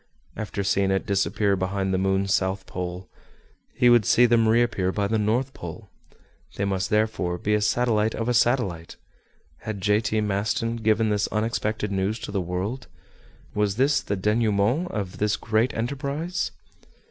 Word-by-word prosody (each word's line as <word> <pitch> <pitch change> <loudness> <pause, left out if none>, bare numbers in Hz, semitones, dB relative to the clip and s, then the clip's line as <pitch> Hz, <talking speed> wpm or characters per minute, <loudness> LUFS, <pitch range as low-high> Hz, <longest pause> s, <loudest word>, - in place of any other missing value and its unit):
After 100 -2 -4
seeing 100 0 +1
it 95 0 0
disappear 100 +1 +1
behind 95 +1 -1
the 95 - +1
moon's 95 0 +1
south 95 0 0
pole, 90 0 -5 0.7
he 125 - +3
would 120 -2 +6
see 120 +5 +5
them 115 -1 +3
reappear 110 -5 +2
by 100 +1 -1
the 110 +2 0
north 120 +6 0
pole! 85 -2 -9 0.6
They 100 - -1
must 95 -1 -1
therefore 105 -5 0
be 105 +4 -1
a 105 - +2
satellite 110 0 +1
of 115 +1 -3
a 125 - +2
satellite! 115 -9 +1 0.6
Had 110 -2 -6
J. 105 +2 +2
T. 110 -1 0
Maston 105 +3 -1
given 110 0 +2
this 105 -1 +1
unexpected 110 -1 -2
news 100 +3 -1
to - - -6
the 100 -2 -1
world? 95 +8 -4 0.7
Was 105 -1 0
this 135 +4 +2
the 100 - -2
denouement 105 - +1
of 100 -4 -5
this 105 0 +1
great 110 +3 +1
enterprise? 140 +8 -2
105 Hz, 160 wpm, -25 LUFS, 95-115 Hz, 0.7 s, would